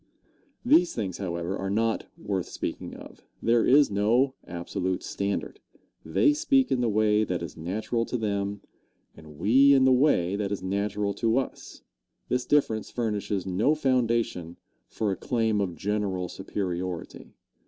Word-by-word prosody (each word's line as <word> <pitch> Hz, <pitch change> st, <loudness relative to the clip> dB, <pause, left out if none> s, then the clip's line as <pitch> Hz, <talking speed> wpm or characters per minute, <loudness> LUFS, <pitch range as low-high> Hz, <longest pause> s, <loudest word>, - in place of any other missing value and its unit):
These 245 Hz, -, +4 dB
things, 95 Hz, -6 st, -3 dB
however, 85 Hz, -1 st, -3 dB
are 95 Hz, -1 st, -3 dB
not 110 Hz, +2 st, 0 dB
worth 95 Hz, -3 st, -3 dB
speaking -, -, -5 dB
of. -, -, -12 dB, 0.2 s
There 115 Hz, 0 st, +3 dB
is 140 Hz, -2 st, +5 dB
no 115 Hz, +7 st, +2 dB
absolute 90 Hz, +2 st, -3 dB
standard. 100 Hz, -, -3 dB, 0.4 s
They 295 Hz, -, +3 dB
speak 290 Hz, -4 st, +2 dB
in 125 Hz, -, +2 dB
the 120 Hz, -, +1 dB
way 105 Hz, 0 st, +3 dB
that 90 Hz, -4 st, -2 dB
is 80 Hz, -, -7 dB
natural 110 Hz, +8 st, -2 dB
to 125 Hz, -, -3 dB
them, 100 Hz, -2 st, -2 dB, 0.5 s
and 75 Hz, -2 st, -14 dB
we 135 Hz, -, +5 dB
in 135 Hz, -, +4 dB
the 130 Hz, -, +5 dB
way 125 Hz, -, +3 dB
that 100 Hz, -1 st, -2 dB
is 100 Hz, -2 st, -3 dB
natural 100 Hz, +1 st, -1 dB
to 115 Hz, +4 st, +1 dB
us. 135 Hz, -, -5 dB, 0.5 s
This 125 Hz, 0 st, -1 dB
difference 115 Hz, -7 st, +1 dB
furnishes 105 Hz, -5 st, -2 dB
no 100 Hz, +11 st, +2 dB
foundation 115 Hz, -, 0 dB, 0.3 s
for 105 Hz, -2 st, -2 dB
a -, -, -1 dB
claim 110 Hz, -1 st, 0 dB
of 90 Hz, -4 st, -2 dB
general 100 Hz, -2 st, -2 dB
superiority. 90 Hz, -3 st, -5 dB
105 Hz, 150 wpm, -27 LUFS, 95-120 Hz, 0.5 s, is